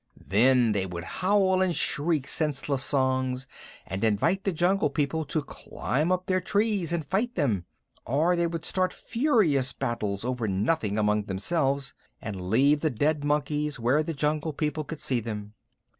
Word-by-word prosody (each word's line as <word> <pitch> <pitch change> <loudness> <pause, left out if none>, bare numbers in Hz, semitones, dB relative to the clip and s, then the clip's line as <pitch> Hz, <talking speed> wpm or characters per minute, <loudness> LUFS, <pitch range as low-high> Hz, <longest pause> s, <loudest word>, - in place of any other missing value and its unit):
Then 120 +4 +4
they 100 -2 0
would 85 -2 -6
howl 190 - +2
and 185 -3 +1
shriek 150 -1 0
senseless 140 -3 -1
songs, 130 -2 0 0.4
and 95 +3 -4
invite 140 - +1
the 195 - +2
Jungle 180 +4 +2
People 155 +1 -1
to 150 +1 -2
climb 145 +4 -2
up 185 0 0
their 185 0 +1
trees 200 -3 0
and 170 -3 -1
fight 210 - -1
them, 115 - 0 0.4
or 155 +9 +2
would 170 -1 -1
start 185 -1 0
furious 210 - +1
battles 115 -5 -3
over 125 -3 -1
nothing 105 +2 0
among 105 -1 +1
themselves, 135 - -1 0.3
and 95 -7 -6
leave 140 +7 +4
the 155 - +2
dead 145 +4 0
monkeys 150 -1 -1
where 125 +6 +3
the 160 0 -4
Jungle 150 +2 -1
People 150 +1 -2
could 155 +1 -7
see 135 -5 0
them. 105 -2 -6
145 Hz, 160 wpm, -27 LUFS, 120-165 Hz, 0.4 s, Then